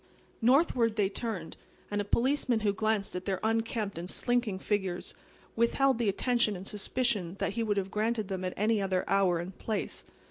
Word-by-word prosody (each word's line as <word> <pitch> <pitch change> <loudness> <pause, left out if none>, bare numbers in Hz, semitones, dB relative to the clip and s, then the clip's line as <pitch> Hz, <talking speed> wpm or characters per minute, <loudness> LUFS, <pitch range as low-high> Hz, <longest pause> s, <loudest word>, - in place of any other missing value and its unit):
Northward 245 -3 +4
they 205 -3 +2
turned; 200 -6 -5 0.3
and 205 0 0
a - - -1
policeman 245 +2 +1
who 205 -1 +2
glanced 215 -1 0
at 180 - -4
their 190 -2 -1
unkempt 220 -4 -1
and 175 +2 -5
slinking 240 -5 +1
figures 190 -3 -2 0.4
withheld 250 +2 +3
the 230 -4 +2
attention 235 +1 +1
and 185 +1 -7
suspicion 210 -4 0
that - - -1
he 230 - -1
would 210 -2 0
have 195 -1 -1
granted 215 0 0
them 190 -1 -3
at 185 - -3
any 215 +1 +2
other 190 -2 0
hour 195 -3 +3
and 175 +3 -5
place. 215 -3 -3
210 Hz, 180 wpm, -30 LUFS, 190-230 Hz, 0.4 s, Northward